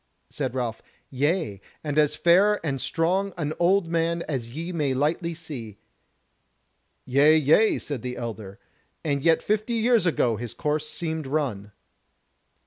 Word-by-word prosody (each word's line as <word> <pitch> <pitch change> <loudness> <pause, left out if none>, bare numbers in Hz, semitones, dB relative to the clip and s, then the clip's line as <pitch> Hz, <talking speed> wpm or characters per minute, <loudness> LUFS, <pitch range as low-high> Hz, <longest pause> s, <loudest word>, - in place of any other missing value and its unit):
Said - - -3
Ralph: 120 -3 -3 0.3
"Yea, 145 - -1 0.2
and 150 -1 0
as 150 0 +3
fair 195 +6 +4
and 135 -4 -2
strong 185 +4 0
an 155 -2 -2
old 180 +1 +3
man 170 0 0
as 130 -6 -3
ye 165 +8 -5
may 145 -6 0
lightly 165 +5 0
see." 130 - -8 1.3
"Yea, 145 +5 +5
yea," 160 +9 +4
said 145 -6 -5
the 125 +1 -5
elder, 110 -4 -6 0.5
"and 140 -3 0
yet 165 +2 +3
fifty 215 +3 0
years 230 -3 +3
ago 120 -8 +1
his 120 0 -6
course 155 0 -1
seemed 160 -3 -4
run." 125 -9 -2
155 Hz, 140 wpm, -25 LUFS, 130-170 Hz, 1.3 s, Yea